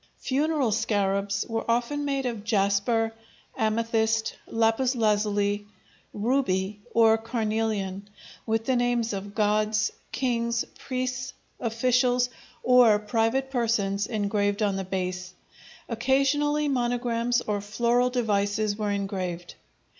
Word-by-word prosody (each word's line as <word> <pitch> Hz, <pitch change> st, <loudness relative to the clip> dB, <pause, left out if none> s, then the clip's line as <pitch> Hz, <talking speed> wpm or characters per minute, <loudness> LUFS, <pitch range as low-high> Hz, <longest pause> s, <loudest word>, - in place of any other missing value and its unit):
Funeral 280 Hz, -2 st, 0 dB
scarabs 200 Hz, -2 st, 0 dB
were 225 Hz, -1 st, -2 dB
often 245 Hz, +5 st, 0 dB
made 275 Hz, -2 st, -1 dB
of 230 Hz, -4 st, -3 dB
jasper, 220 Hz, +2 st, +1 dB, 0.4 s
amethyst, 220 Hz, 0 st, 0 dB
lapis 230 Hz, +3 st, +1 dB
lazuli, 205 Hz, -2 st, +1 dB, 0.4 s
ruby, 210 Hz, -4 st, 0 dB
or 225 Hz, -1 st, +5 dB
carnelian, 215 Hz, -4 st, -2 dB, 0.4 s
with 225 Hz, 0 st, 0 dB
the 260 Hz, -, +1 dB
names 240 Hz, -2 st, +1 dB
of 200 Hz, +1 st, -6 dB
gods, 215 Hz, 0 st, +1 dB, 0.2 s
kings, 235 Hz, -2 st, 0 dB
priests, 255 Hz, 0 st, -3 dB, 0.3 s
officials, 245 Hz, +2 st, +2 dB, 0.3 s
or 245 Hz, -4 st, +6 dB
private 225 Hz, +5 st, 0 dB
persons 210 Hz, -5 st, 0 dB
engraved 205 Hz, -1 st, 0 dB
on 200 Hz, -2 st, +1 dB
the 195 Hz, -, -2 dB
base; 180 Hz, -1 st, -4 dB, 0.5 s
occasionally 275 Hz, +5 st, +1 dB
monograms 240 Hz, -2 st, 0 dB
or 205 Hz, -1 st, -2 dB
floral 235 Hz, +4 st, +1 dB
devices 210 Hz, -3 st, 0 dB
were 210 Hz, -1 st, -2 dB
engraved. 185 Hz, -4 st, -3 dB
225 Hz, 105 wpm, -26 LUFS, 205-245 Hz, 0.5 s, or